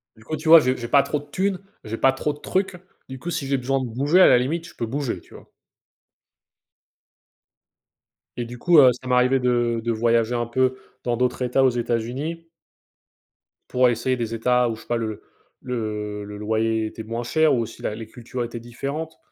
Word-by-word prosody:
Du 110 - -18
coup, 155 +6 -4
tu 155 +2 -7
vois? 165 0 +11
J'ai 130 -2 +1
j'ai 120 - -5
pas 140 +2 +5
trop 150 - -2
de 145 - -13
tunes, 190 +1 0 0.2
j'ai 110 +1 -5
pas 135 - +4
trop 145 +2 -2
de 150 - -14
trucs. 190 +1 -1 0.3
Du 130 -1 -7
coup, 175 - -6
si 140 -5 -3
j'ai 135 0 +1
besoin 135 +2 0
de 130 - -3
bouger 140 +10 +2
à - - +9
la 125 - +6
limite, 165 +7 -2
je - - -15
peux 115 - -3
bouger, 125 -5 -3
tu - - -20
vois? - - -14 2.9
Et 120 - -2
du 120 +1 -9
coup, 175 +2 +4
heu, 130 -2 +8
ça 130 +1 -11
m'arrivait 125 +1 +3
de 120 -2 +1
de 120 - 0
voyager 115 +1 +1
un 120 0 0
peu 130 +2 +1 0.3
dans 120 -1 -1
d'autres 125 0 0
états, 125 +2 +2
aux 130 - +6
États-Unis. 125 +8 -3 1.2
Pour 125 0 +4
essayer 120 +2 0
des 115 -2 -3
états 125 +1 +2
où 110 - -3
je 115 - -13
sais - - -18
pas, 120 - 0
le 110 -2 -4 0.4
le 105 -4 -4
le 105 0 -8
loyer 110 +1 0
était 110 +1 -7
moins 115 +2 -4
cher 155 +4 +3
ou 120 - +2
aussi 115 - -7
la 105 - -3
les 110 -1 -8
cultures 120 +2 -6
étaient 120 0 -6
différentes. 140 +7 -6
125 Hz, 210 wpm, -23 LUFS, 115-135 Hz, 2.9 s, vois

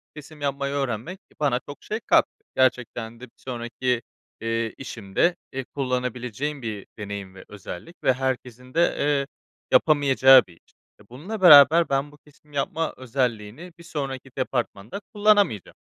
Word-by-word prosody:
kesim 150 0 -12
yapmayı 140 0 -2
öğrenmek, 135 - -3
e, - - -35
bana 135 -4 +1
çok 145 - -10
şey 215 +2 -3
kattı. - - +5 0.3
Gerçekten 120 -3 0
de - - -13
bir 125 - -11
sonraki, 125 0 -3 0.4
eee, 115 0 -1
işimde, 120 - -1 0.2
eee, 135 -1 -4
kullanabileceğim 125 +1 -3
bir 105 -4 -5
deneyim 100 -2 -6
ve 95 - -12
özellik 105 - -9
ve 130 - +4
herkesin 125 -1 -4
de, 170 +1 +2
eee, 140 -1 +1 0.4
yapamayacağı 135 -3 +6
bir 85 - -16
iş. - - -28 0.3
E, - - -17
bununla 185 - -7
beraber 160 0 +8
ben 140 +1 0
bu 150 - -17
kesim 150 0 -24
yapma 160 +3 -2
özelliğini 125 +4 -3
bir 170 - -12
sonraki 135 -5 -5
departmanda 125 - -3
kullanamayacağım. 205 - +2
130 Hz, 145 wpm, -24 LUFS, 120-145 Hz, 0.4 s, beraber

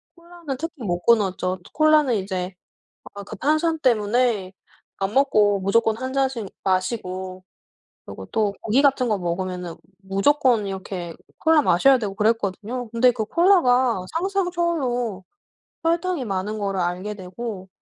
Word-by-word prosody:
콜라는 340 -5 -8
특히 325 -5 -6
못 175 -3 -2
끊었죠. 190 -5 +2
또 - - -17
콜라는 305 -5 +4
이제 190 -2 -3 0.6
아 200 - -7
그 215 - -9
탄산 310 - +1
때문에 225 -5 +1 0.5
밥 195 +1 -2
먹고 215 -7 +3
무조건 220 +3 +2
1 260 +2 -5
잔씩 265 -5 -1 0.2
마시고 185 -1 -2 0.6
그리고 95 - -9
또 210 -2 0
고기 230 +5 +2
같은 275 -3 +3
거 210 - +1
먹으면은 180 -1 -4 0.3
무조건 220 +3 +2
이렇게 190 -3 -6 0.3
콜라 320 -1 +4
마셔야 270 +6 +4
되고 200 -4 -4
그랬거든요. 220 +2 -1
근데 240 +2 +4
그 220 - -3
콜라가 255 - +3
상상 380 +1 0
초월로 250 - -1 0.6
설탕이 335 -2 0
많은 205 +2 -3
거를 195 -1 -2
알게 180 +4 -2
되고 190 +1 -7
220 Hz, 290 characters per minute, -23 LUFS, 190-275 Hz, 0.6 s, 콜라는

